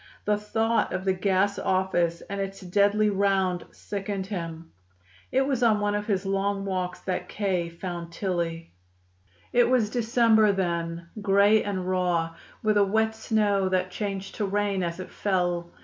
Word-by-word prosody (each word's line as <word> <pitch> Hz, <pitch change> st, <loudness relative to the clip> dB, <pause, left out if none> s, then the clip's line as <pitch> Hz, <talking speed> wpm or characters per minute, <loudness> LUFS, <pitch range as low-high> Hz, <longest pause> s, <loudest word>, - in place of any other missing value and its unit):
The 210 Hz, -, +3 dB
thought 225 Hz, +2 st, 0 dB
of 185 Hz, +1 st, -3 dB
the 190 Hz, -, +3 dB
gas 195 Hz, +1 st, +1 dB
office 175 Hz, -3 st, +1 dB
and 200 Hz, 0 st, -5 dB
its 195 Hz, 0 st, -4 dB
deadly 205 Hz, +3 st, +2 dB
round 190 Hz, -2 st, +1 dB
sickened 200 Hz, -1 st, -5 dB
him. 165 Hz, -4 st, -6 dB, 0.6 s
It 265 Hz, +1 st, +3 dB
was 265 Hz, -3 st, -1 dB
on 220 Hz, -3 st, +4 dB
one 205 Hz, 0 st, 0 dB
of 205 Hz, 0 st, -2 dB
his 195 Hz, -2 st, 0 dB
long 195 Hz, 0 st, 0 dB
walks 185 Hz, -2 st, -3 dB
that 185 Hz, -1 st, -3 dB
K. 185 Hz, -5 st, -1 dB
found 170 Hz, 0 st, -6 dB
Tillie. 170 Hz, -, -3 dB, 0.8 s
It 245 Hz, 0 st, +4 dB
was 235 Hz, -5 st, +2 dB
December 225 Hz, -3 st, +4 dB
then, 170 Hz, -2 st, -2 dB
gray 205 Hz, +2 st, +4 dB
and 190 Hz, -3 st, -3 dB
raw, 175 Hz, -3 st, 0 dB, 0.3 s
with 215 Hz, -1 st, +3 dB
a 205 Hz, -, +6 dB
wet 220 Hz, +3 st, +1 dB
snow 210 Hz, -3 st, +1 dB
that 185 Hz, 0 st, 0 dB
changed 195 Hz, 0 st, -4 dB
to 210 Hz, -, 0 dB
rain 200 Hz, -1 st, 0 dB
as 170 Hz, 0 st, -3 dB
it 185 Hz, -, -7 dB
fell. 175 Hz, -3 st, -1 dB
195 Hz, 160 wpm, -26 LUFS, 180-210 Hz, 0.8 s, a